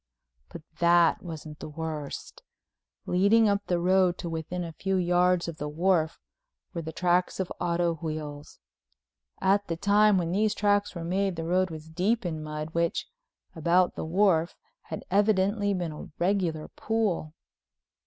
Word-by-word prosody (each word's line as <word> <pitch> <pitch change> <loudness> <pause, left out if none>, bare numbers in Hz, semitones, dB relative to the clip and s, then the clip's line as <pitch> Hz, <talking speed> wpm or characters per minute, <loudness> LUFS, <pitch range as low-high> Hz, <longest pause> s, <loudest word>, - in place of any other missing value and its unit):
But 160 - -10 0.2
that 170 -1 +4
wasn't 155 -3 -8
the - - -7
worst—leading 165 +6 -2
up 200 0 0
the 175 - +1
road 180 0 +3
to 170 - -5
within 165 +2 -4
a 165 -1 -6
few 195 +4 -2
yards 180 0 +2
of 165 -2 -6
the 150 - -4
wharf 165 0 +1 0.5
were 170 - -3
the 160 0 -6
tracks 180 +3 +1
of 190 - -2
auto 170 0 +1
wheels. 155 -2 -6 0.8
At 200 +1 +2
the 165 - -3
time 205 +2 +4
when 170 -2 -1
these 210 +3 +1
tracks 205 -1 +1
were 170 - -5
made 190 +2 0
the 165 0 -4
road 185 +2 +1
was 160 -1 -8
deep 195 +7 0
in 160 -3 -3
mud 155 0 -5
which, 170 0 -1 0.5
about 170 +3 +3
the - - -5
wharf, 170 -1 +2 0.3
had - - -7
evidently 205 0 +2
been 175 -4 -2
a 150 - -9
regular 175 -4 0
pool. 205 -8 -2
175 Hz, 155 wpm, -27 LUFS, 160-195 Hz, 0.8 s, that